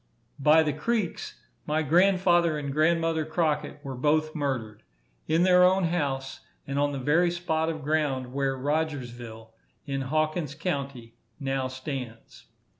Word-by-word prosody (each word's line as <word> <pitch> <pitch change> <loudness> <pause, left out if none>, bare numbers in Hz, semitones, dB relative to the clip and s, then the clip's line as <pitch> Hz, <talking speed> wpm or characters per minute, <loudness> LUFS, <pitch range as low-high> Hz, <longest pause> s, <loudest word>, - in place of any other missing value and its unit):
By 155 +3 +5
the 150 -2 -1
Creeks, 205 +5 -2 0.3
my 155 +1 +1
grandfather 175 0 +3
and 140 -2 -4
grandmother 165 +1 +2
Crockett 155 -2 -1
were 135 - -4
both 155 +4 +1
murdered, 125 -8 -3 0.5
in 165 +2 +3
their 180 0 +6
own 185 +1 +4
house, 140 -6 -2 0.3
and 140 0 -2
on 145 0 +2
the 140 - -4
very 160 +7 +2
spot 165 -2 -1
of 155 -3 -5
ground 140 -4 -1
where 135 -1 -1
Rogersville, 125 -6 -4 0.3
in 135 -2 -2
Hawkins 155 +1 -1
county, 140 -8 -4 0.2
now 135 -1 -1
stands. 130 -3 -7
150 Hz, 135 wpm, -27 LUFS, 135-160 Hz, 0.5 s, their